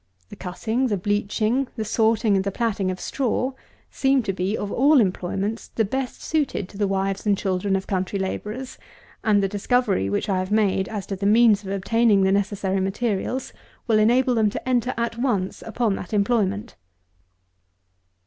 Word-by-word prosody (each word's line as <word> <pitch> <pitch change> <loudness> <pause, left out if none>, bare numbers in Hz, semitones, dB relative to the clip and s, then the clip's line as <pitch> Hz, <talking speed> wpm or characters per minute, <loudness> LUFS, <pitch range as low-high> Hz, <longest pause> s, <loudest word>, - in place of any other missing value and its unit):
The - - -9
cutting, 220 +8 -2
the 205 -4 0
bleaching, 215 +6 0
the 220 -3 -3
sorting, 220 0 +2
and 190 - +1
the 200 - -1
platting 200 -2 -1
of 185 0 -4
straw, 255 0 -1 0.4
seem 270 -1 +2
to 195 - -2
be, 190 +3 -1
of 200 - -4
all 285 +3 +5
employments, 195 +2 -1
the 225 - -1
best 265 +5 -4
suited 290 - -1
to 200 - -12
the 205 - +2
wives 195 +1 -1
and 200 -1 +3
children 195 0 0
of 190 0 -2
country 190 0 -2
labourers; 210 +6 -5 0.4
and 205 -3 +3
the - - +2
discovery 205 - +1
which 100 - -1
I 190 -2 +1
have 185 0 -3
made, 200 -3 +1
as 210 -3 -4
to 195 - -4
the 200 +1 -1
means 215 -1 +5
of 190 - -7
obtaining 200 +1 +2
the 190 - +3
necessary 195 -1 0
materials, 210 +5 -2 0.3
will 220 -3 +3
enable 245 +4 +3
them 220 -3 +3
to 210 - -6
enter 250 0 +1
at 235 0 -2
once 210 -8 -1
upon 225 -2 -1
that 180 - -8
employment. 205 0 0
210 Hz, 175 wpm, -23 LUFS, 195-235 Hz, 0.4 s, all